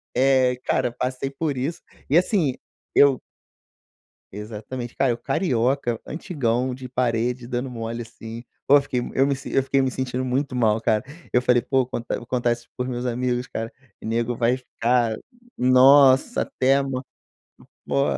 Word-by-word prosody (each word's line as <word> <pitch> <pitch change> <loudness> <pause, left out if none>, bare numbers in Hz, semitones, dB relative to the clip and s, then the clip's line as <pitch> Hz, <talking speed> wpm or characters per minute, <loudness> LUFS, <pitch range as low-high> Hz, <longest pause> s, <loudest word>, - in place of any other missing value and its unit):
eh, 130 -1 +3
cara, 120 - +1
passei 130 +2 -3
por 140 +1 -2
isso, 160 +7 -3 0.3
e 145 - +5
assim, 175 - +2 0.4
eu 140 -2 +5 1.1
Exatamente, 110 +4 -7
cara, 135 - +2
eu, 120 - -1
carioca, 125 - 0
antigão, 130 -6 -1
de 130 0 -8
parede, 120 0 -1
dando 125 +2 -2
mole 115 -1 -5
assim. 115 0 -9 0.2
Pô, 145 +1 +7
fiquei 130 -3 -2
eu 135 +2 +1
me 140 - +1
eu 135 - +1
fiquei 135 0 +2
me 130 - +1
sentindo 130 0 -3
muito 130 +1 -1
mal, 110 -3 +2
cara. 110 -1 +1 0.3
Eu 125 - +3
falei: 125 -1 +4
"Pô, 130 +2 +1
contar 120 -1 -4
vou 120 - -9
contar 120 -1 +1
isso 120 0 -7
para 125 - -2
os - - -5
meus 120 0 -3
amigos, 125 +1 -1
cara, 115 0 -5 0.3
e - - -9
nego 115 +1 -1
vai 120 +2 +2
ficar, 120 -2 0 0.4
nossa, 130 - +6
até 130 +1 +1
ama". 135 -2 -2 0.8
Pô, 70 -1 +2
125 Hz, 160 wpm, -23 LUFS, 120-135 Hz, 1.1 s, Pô